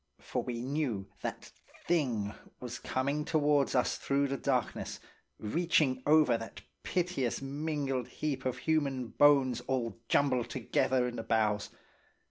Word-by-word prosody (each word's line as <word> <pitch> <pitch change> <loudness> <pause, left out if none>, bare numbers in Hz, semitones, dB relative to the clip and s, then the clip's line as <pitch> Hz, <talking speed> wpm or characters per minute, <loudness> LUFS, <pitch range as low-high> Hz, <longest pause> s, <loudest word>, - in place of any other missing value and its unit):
For - - -3
we 120 -1 -4
knew 125 -8 -2
that - - -5 0.3
thing 120 -12 0 0.3
was 125 0 -6
coming 140 +3 -1
towards 145 -3 +2
us 125 - +2
through 140 0 +1
the 135 - -1
darkness, 130 -5 -1 0.4
reaching 145 +1 +1
over 150 -6 +5
that 115 - -8 0.2
piteous 175 -9 -1
mingled 140 -2 -2
heap 140 -3 -3
of 130 -1 -1
human 135 -3 0
bones 135 -4 +4
all 120 -4 -1
jumbled 130 -4 +2
together 130 0 +1
in 120 - -5
the 115 - -4
bows. 105 -2 +1
130 Hz, 130 wpm, -31 LUFS, 120-145 Hz, 0.4 s, over